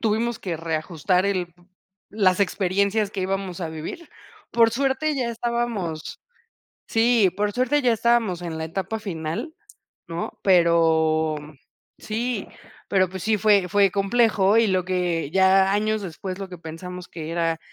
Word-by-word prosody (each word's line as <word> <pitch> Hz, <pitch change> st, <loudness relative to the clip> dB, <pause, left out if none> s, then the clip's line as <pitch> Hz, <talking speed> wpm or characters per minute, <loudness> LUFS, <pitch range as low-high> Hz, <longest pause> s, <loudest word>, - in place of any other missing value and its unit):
tuvimos 230 Hz, +1 st, 0 dB
que 175 Hz, -4 st, -4 dB
reajustar 165 Hz, +3 st, -1 dB
el 180 Hz, -4 st, -2 dB, 0.6 s
las 195 Hz, -2 st, +2 dB
experiencias 200 Hz, +2 st, +1 dB
que 200 Hz, -, -4 dB
íbamos 190 Hz, -1 st, -3 dB
a 170 Hz, -, -3 dB
vivir. 160 Hz, -, -7 dB, 0.4 s
Por 230 Hz, -1 st, +4 dB
suerte, 275 Hz, +4 st, 0 dB
ya 250 Hz, -3 st, -1 dB
estábamos 230 Hz, -9 st, -3 dB, 0.7 s
sí, 225 Hz, -3 st, +3 dB
por 205 Hz, 0 st, 0 dB
suerte 260 Hz, +4 st, +1 dB
ya 245 Hz, -2 st, +3 dB
estábamos, 225 Hz, -6 st, +1 dB
en 165 Hz, -2 st, -5 dB
la 160 Hz, -, -3 dB
etapa 195 Hz, +6 st, -4 dB
final, 170 Hz, -, -4 dB, 0.5 s
¿no? 170 Hz, 0 st, -5 dB
Pero, 160 Hz, -3 st, +3 dB
mm 150 Hz, +1 st, -12 dB, 0.4 s
sí, 225 Hz, 0 st, -3 dB, 0.4 s
pero, 190 Hz, -1 st, +3 dB
pues 190 Hz, -2 st, -7 dB
sí, 220 Hz, -1 st, +2 dB
fue 205 Hz, -3 st, +3 dB
fue 200 Hz, -1 st, +4 dB
complejo, 205 Hz, 0 st, +3 dB
y 230 Hz, -1 st, +4 dB
lo 185 Hz, -1 st, +1 dB
que 175 Hz, -5 st, -1 dB
ya, 190 Hz, +1 st, +4 dB
años 215 Hz, +1 st, 0 dB
después, 185 Hz, +1 st, -6 dB
lo 195 Hz, -1 st, -6 dB
que 180 Hz, -, -9 dB
pensamos 175 Hz, +2 st, -8 dB
que 160 Hz, -1 st, -7 dB
era 165 Hz, -1 st, 0 dB
190 Hz, 150 wpm, -23 LUFS, 170-220 Hz, 0.7 s, Por